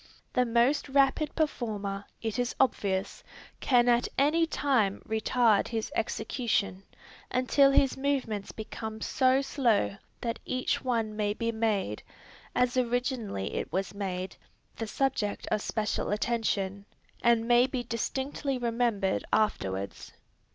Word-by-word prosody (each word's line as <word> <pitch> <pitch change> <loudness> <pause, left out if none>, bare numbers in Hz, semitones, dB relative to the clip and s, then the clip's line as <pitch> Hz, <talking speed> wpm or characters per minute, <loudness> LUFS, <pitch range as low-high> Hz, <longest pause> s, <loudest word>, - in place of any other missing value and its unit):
The 250 -1 +2
most 240 +6 +2
rapid 275 +2 +2
performer, 205 -10 -2 0.2
it 225 +2 -2
is 245 0 -1
obvious, 200 -7 0 0.4
can 245 -2 +3
at 240 0 +4
any 315 +4 +3
time 245 -11 +1
retard 220 0 +2
his 225 -2 -3
execution, 220 -4 -1 0.5
until 255 +2 +4
his 275 -1 +3
movements 265 -7 -1
become 220 0 -6
so 260 +1 +3
slow 240 -8 +1 0.3
that 230 -1 -2
each 255 0 -1
one 230 -4 -1
may 210 -1 0
be 230 +1 -1
made, 215 - -1 0.5
as 250 +1 +2
originally 245 - -1
it - - -3
was 190 +4 -2
made, 190 -2 -4 0.4
the 225 - -4
subject 240 -4 -1
of 210 - +1
special 210 -1 -1
attention, 205 -3 -1 0.4
and 235 -1 +4
may 245 +1 +5
be 255 -2 -3
distinctly 265 +4 -2
remembered 230 -5 0
afterwards. 100 - -1
230 Hz, 125 wpm, -29 LUFS, 205-255 Hz, 0.5 s, may